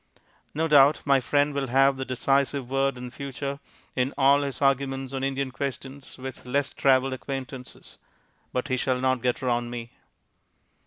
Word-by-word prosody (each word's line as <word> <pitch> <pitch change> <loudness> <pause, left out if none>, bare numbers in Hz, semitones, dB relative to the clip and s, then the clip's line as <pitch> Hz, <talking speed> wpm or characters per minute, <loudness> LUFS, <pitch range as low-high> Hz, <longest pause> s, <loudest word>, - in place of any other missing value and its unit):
No 160 +2 +1
doubt 145 -1 +5
my 140 -2 +4
friend 145 +3 +1
will 140 -1 -1
have 135 +2 +4
the 130 0 -4
decisive 135 0 0
word 135 -1 +1
in 125 0 -7
future 140 +1 -5 0.4
in 130 +1 0
all 140 +1 +5
his 140 -2 -3
arguments 135 -1 0
on 135 0 -3
Indian 135 -1 -1
questions 135 +1 -6
with 130 0 -8
less 140 +2 0
travelled 135 -1 +3
acquaintances. 130 -1 -7 0.5
But 125 +3 -2
he 130 - +1
shall 130 0 0
not 130 -1 +1
get 125 +1 -1
round 120 -1 0
me. 120 -1 -6
135 Hz, 160 wpm, -26 LUFS, 130-140 Hz, 0.5 s, doubt